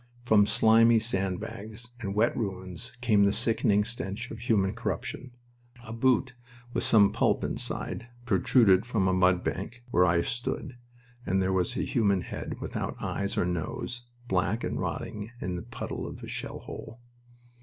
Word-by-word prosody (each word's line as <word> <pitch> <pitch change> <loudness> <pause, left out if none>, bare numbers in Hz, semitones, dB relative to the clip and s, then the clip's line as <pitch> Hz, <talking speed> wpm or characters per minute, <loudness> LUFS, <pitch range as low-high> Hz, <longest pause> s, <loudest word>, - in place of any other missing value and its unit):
From 105 -3 +5
slimy 115 +1 +5
sand 95 -5 0
bags 110 +4 -8
and 100 -4 -4
wet 110 +3 +3
ruins 95 0 -5
came 110 -4 +4
the 100 - +4
sickening 110 -2 +2
stench 105 -3 -4
of 110 - -7
human 105 -4 +2
corruption. 125 +3 -4 0.6
A 110 - -7
boot 125 +2 +2 0.4
with - - 0
some 100 -3 +5
pulp - - +1
inside 120 - -3 0.2
protruded 100 -1 +4
from 115 -5 0
a 95 - +2
mud 90 -1 +3
bank 115 +6 -4
where 90 -3 +5
I 85 0 +3
stood, 125 - -3 0.5
and 95 -5 +1
there 95 0 +1
was 90 -2 0
a - - 0
human 100 -5 +2
head, - - -6
without - - -4
eyes 100 0 -2
or - - +2
nose, 90 +8 -3 0.3
black, 95 +4 0
and - - -2
rotting 105 +2 -4
in 90 -4 -3
the 90 - -4
puddle - - -5
of - - -9
a - - -6
shell - - -5
hole. 115 +2 -9
105 Hz, 165 wpm, -28 LUFS, 95-115 Hz, 0.6 s, From